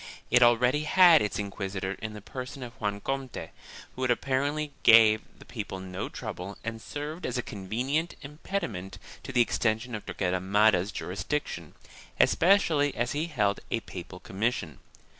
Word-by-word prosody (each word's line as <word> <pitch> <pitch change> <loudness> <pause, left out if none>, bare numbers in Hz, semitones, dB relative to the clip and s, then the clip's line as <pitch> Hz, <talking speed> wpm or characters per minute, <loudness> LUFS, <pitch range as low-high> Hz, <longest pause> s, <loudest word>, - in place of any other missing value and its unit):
It 120 +1 +6
already 125 +5 +4
had 175 -1 +7
its 105 - -1
inquisitor 95 -1 -3
in 110 -1 -5
the 105 -1 -10
person 130 +3 -7
of 120 -1 -8
Juan 100 -1 -2
Comte, 135 0 -4 0.4
who 130 - -4
apparently 140 +4 0
gave 110 -1 +7 0.2
the - - -15
people 105 -5 -6
no 95 0 -5
trouble 95 +3 -6
and 115 0 -5
served 150 +8 -6
as - - -2
a 125 - -1
convenient 125 - -2
impediment 145 - -5 0.2
to - - -7
the 125 -2 +4
extension 115 +1 0
of 110 - -4
Torquemada's 95 +1 +2
jurisdiction, 90 - -4 0.4
especially 165 -6 +4
as 120 +1 -1
he 155 +3 -1
held 105 -10 0
a 115 - -1
papal 90 -1 -9
commission. 95 - -2
115 Hz, 145 wpm, -28 LUFS, 100-140 Hz, 0.4 s, had